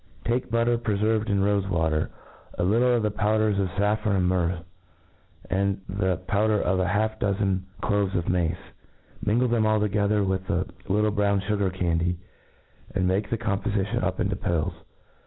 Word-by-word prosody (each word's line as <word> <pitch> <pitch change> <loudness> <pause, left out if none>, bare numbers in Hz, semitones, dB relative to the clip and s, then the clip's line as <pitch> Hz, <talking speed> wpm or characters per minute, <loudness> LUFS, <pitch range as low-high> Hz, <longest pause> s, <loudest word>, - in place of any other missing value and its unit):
Take 120 +2 0
biittcr 115 +1 +2
preferved 110 0 0
in 100 -1 +2
rofe 100 -1 +1
vtratcr^ 80 -3 +1 0.5
a - - 0
little 120 +6 +3
of 115 - 0
thej)owder8 105 0 +1
of 95 - 0
faffron 105 +2 0
and 90 -2 +2
myrrh, 90 -1 0 0.8
and, 100 +1 0
the 95 -2 0
powder 105 +2 +2
of 95 0 +1
half 105 +4 0
a - - -26
dozen 95 -2 0
cloves 100 -2 0
of 85 -2 -1
mace 85 -1 +1 0.7
J 105 - +1
minglcf 120 +2 +2
them 110 -2 +3
all 110 0 +3
together 105 0 +1
with 95 -1 -2
a 90 +2 +1 0.2
little 105 +2 +2
brown 100 -1 +1
fugar 100 -1 0
candy^ 85 -1 0 0.8
and 95 -2 +2
make 95 +3 0
the 115 - 0
com 110 -4 -1
pofition 100 -2 -1
up - - -1
into - - 0
pills. 80 -3 -1
100 Hz, 170 wpm, -26 LUFS, 95-110 Hz, 0.8 s, little